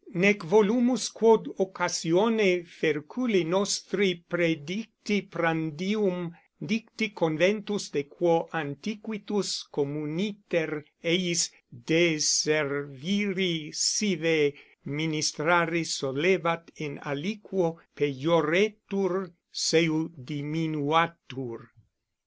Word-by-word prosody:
Nec 200 +4 +5
volumus 220 +5 +4
quod 225 0 +5
occasione 185 +1 +2
ferculi 170 - -1
nostri 190 0 0
predicti 180 +5 -2
prandium 175 +1 -2 0.2
dicti 220 0 -3
Conventus 195 +4 0
de 140 - -2
quo 170 +2 +1
antiquitus 200 +6 -4
communiter 155 +2 -3 0.2
eis 175 0 +2 0.2
deserviri 155 - +1
sive 165 -7 +2 0.3
ministrari 160 +3 +1
solebat 165 +3 0
in 150 -2 -7
aliquo 170 +2 -3 0.2
pejoretur 180 +6 +1 0.2
seu 160 -1 +2
diminuatur. 145 -3 -2
170 Hz, 65 wpm, -27 LUFS, 155-195 Hz, 0.3 s, Nec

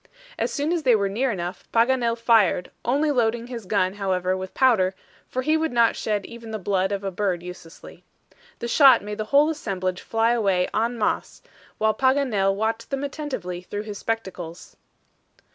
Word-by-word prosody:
As - - 0
soon 290 +2 -1
as 340 - 0
they 250 -5 +4
were 200 -2 +1
near 245 +7 0
enough, 180 -3 -5
Paganel 235 0 +2
fired, 225 -6 +3
only 290 +5 +1
loading 235 -3 +1
his 235 -5 -8
gun, 185 -2 +1
however, 185 -2 -1
with 190 0 -7
powder, 205 -8 +3 0.3
for 255 - -3
he 310 +4 +2
would 320 0 0
not 235 -1 +3
shed 210 -2 -2
even 235 -1 -10
the 220 - -3
blood 190 -1 0
of 200 0 -2
a 195 - -2
bird 185 -2 -1
uselessly. 180 -2 -11 0.5
The 235 - -5
shot 260 -1 +6
made 210 +1 -6
the 215 - -1
whole 290 +6 +4
assemblage 185 - -3
fly 225 +1 +1
away 195 -6 +2
en 230 +2 0
masse, 215 - -2 0.3
while 220 0 +2
Paganel 255 -8 +2
watched 225 +2 -2
them 275 0 -2
attentively 270 - -5
through 205 +3 -5
his 210 -2 -7
spectacles. 185 -7 -5
220 Hz, 180 wpm, -24 LUFS, 190-245 Hz, 0.5 s, shot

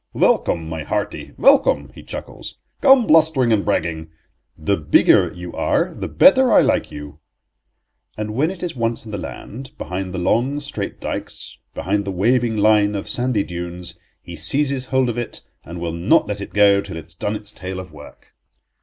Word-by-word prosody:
"Welcome, 80 -2 +1
my 80 -1 -5
hearty, - - -4
welcome," - - +3
he - - -12
chuckles, - - -8 0.2
"come 270 -4 +6
blustering 155 - +4
and 100 -2 +1
bragging; 80 -5 -2 0.5
the 80 +6 0
bigger 75 -4 +4
you 90 0 -9
are - - 0
the - - -5
better 265 -3 +5
I - - +7
like - - 0
you." 75 +1 -9 1.0
And 105 0 -4
when 145 +8 +1
it 185 -1 -8
is 175 -4 -3
once 115 -1 -2
in 110 - -9
the 100 - -4
land, 130 +8 -9
behind 90 +1 -5
the 90 - -5
long, 120 +10 0
straight 145 -9 -5
dykes, - - -6 0.2
behind 100 +2 -1
the 100 - -3
waving 115 +4 +1
line 105 0 +3
of 100 - -4
sandy 120 -4 0
dunes, 85 0 -7 0.3
he - - -9
seizes 135 - 0
hold 130 0 +1
of 120 0 -2
it, 120 - -6 0.2
and 85 +2 -8
will 85 -1 -3
not 85 +3 +3
let 105 -1 -4
it - - -7
go 100 -1 +4
till 95 -4 -8
it 80 - -7
has 80 - -11
done 105 +5 -3
its 105 -1 -6
tale 95 -2 -6
of 90 -2 -9
work. 75 -1 -15
105 Hz, 185 wpm, -20 LUFS, 90-125 Hz, 1.0 s, I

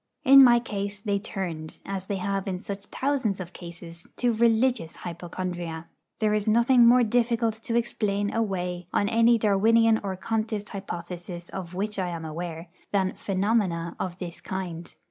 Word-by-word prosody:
In 275 +1 +10
my 240 -2 +7
case 205 -3 -4
they 205 -1 -1
turned, 175 -6 -5
as 190 -1 -4
they 200 - -1
have 195 +1 -2
in 185 -2 -2
such 200 +1 -6
thousands 260 -8 -1
of 180 0 -7
cases, 170 -1 -10
to 245 -1 +1
religious 230 -4 +2
hypochondria. 175 -1 -5 0.3
There 215 -1 +1
is 210 0 0
nothing 235 +2 +5
more 245 +1 +6
difficult 230 0 +1
to 230 - -3
explain 205 -3 0
away, 180 -5 -2
on 200 - +1
any 230 +1 +4
Darwinian 220 +2 +4
or 195 -2 -3
Contist 215 +1 -2
hypothesis 175 -2 -6
of 180 -2 -7
which 205 +2 -2
I 185 - 0
am 165 -2 -5
aware, 165 +1 -6 0.2
than 190 -2 +1
'phenomena' 190 -4 0
of 180 -2 -3
this 180 -2 -7
kind. 175 -3 -5
200 Hz, 160 wpm, -26 LUFS, 175-225 Hz, 0.3 s, In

